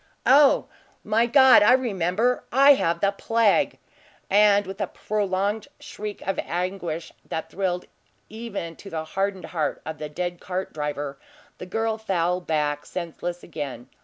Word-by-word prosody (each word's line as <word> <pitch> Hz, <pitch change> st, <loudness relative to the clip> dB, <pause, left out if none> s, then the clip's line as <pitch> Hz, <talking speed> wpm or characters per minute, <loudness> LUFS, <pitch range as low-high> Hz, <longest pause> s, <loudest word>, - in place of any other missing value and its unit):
"O, 280 Hz, +1 st, +6 dB, 0.4 s
my 225 Hz, +2 st, +2 dB
God, 265 Hz, +1 st, +7 dB
I 210 Hz, -, +6 dB
remember! 225 Hz, -1 st, +1 dB
I 275 Hz, +3 st, +7 dB
have 170 Hz, -10 st, 0 dB
the 200 Hz, -, +3 dB
plague!" 225 Hz, +1 st, +2 dB, 0.5 s
And, 205 Hz, 0 st, +5 dB
with 190 Hz, +1 st, -7 dB
a -, -, 0 dB
prolonged 205 Hz, 0 st, -2 dB
shriek 210 Hz, -1 st, -7 dB
of 195 Hz, -, -1 dB
anguish, 175 Hz, -2 st, -3 dB, 0.2 s
that 160 Hz, -, -4 dB
thrilled 180 Hz, -2 st, -2 dB, 0.4 s
even 210 Hz, -7 st, -6 dB
to 200 Hz, -, -11 dB
the 160 Hz, -2 st, -4 dB
hardened 195 Hz, +3 st, -2 dB
heart 160 Hz, -3 st, -2 dB
of 155 Hz, -1 st, -6 dB
the 150 Hz, -, -5 dB
dead 175 Hz, +3 st, -4 dB
cart 185 Hz, +1 st, -4 dB
driver, 145 Hz, -2 st, -4 dB, 0.4 s
the 180 Hz, -, -7 dB
girl 225 Hz, +3 st, -1 dB
fell 180 Hz, -4 st, 0 dB
back 150 Hz, -3 st, -1 dB
senseless 175 Hz, 0 st, -5 dB
again. 145 Hz, -7 st, -6 dB
190 Hz, 145 wpm, -24 LUFS, 165-215 Hz, 0.5 s, God